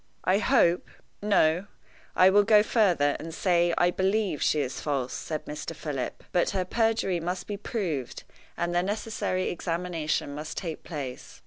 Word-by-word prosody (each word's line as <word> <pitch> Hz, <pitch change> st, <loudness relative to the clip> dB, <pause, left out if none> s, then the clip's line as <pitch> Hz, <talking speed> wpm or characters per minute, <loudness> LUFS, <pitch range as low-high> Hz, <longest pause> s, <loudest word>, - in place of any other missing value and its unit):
"I 190 Hz, +2 st, +3 dB
hope 215 Hz, -9 st, +3 dB, 0.3 s
no, 190 Hz, -3 st, +2 dB, 0.5 s
I 185 Hz, +1 st, +6 dB
will 205 Hz, +1 st, +6 dB
go 210 Hz, 0 st, +5 dB
further, 180 Hz, -11 st, +2 dB
and 165 Hz, +1 st, -7 dB
say 175 Hz, -2 st, +2 dB
I 175 Hz, 0 st, +4 dB
believe 195 Hz, -2 st, 0 dB
she 155 Hz, -, +2 dB
is 130 Hz, -3 st, -3 dB
false," 135 Hz, -4 st, -2 dB
said 155 Hz, -1 st, -4 dB
Mr. 150 Hz, +2 st, -6 dB
Philip. 145 Hz, -5 st, -4 dB
"But 175 Hz, -2 st, +2 dB
her 185 Hz, -2 st, -1 dB
perjury 225 Hz, -3 st, +1 dB
must 180 Hz, +3 st, -3 dB
be 205 Hz, -, -4 dB
proved, 185 Hz, -, -3 dB, 0.3 s
and 175 Hz, 0 st, -1 dB
the 175 Hz, -, +3 dB
necessary 200 Hz, -1 st, -2 dB
examination 170 Hz, -4 st, -2 dB
must 150 Hz, +2 st, -6 dB
take 165 Hz, -4 st, -4 dB
place. 140 Hz, -6 st, -7 dB
175 Hz, 155 wpm, -27 LUFS, 155-200 Hz, 0.5 s, I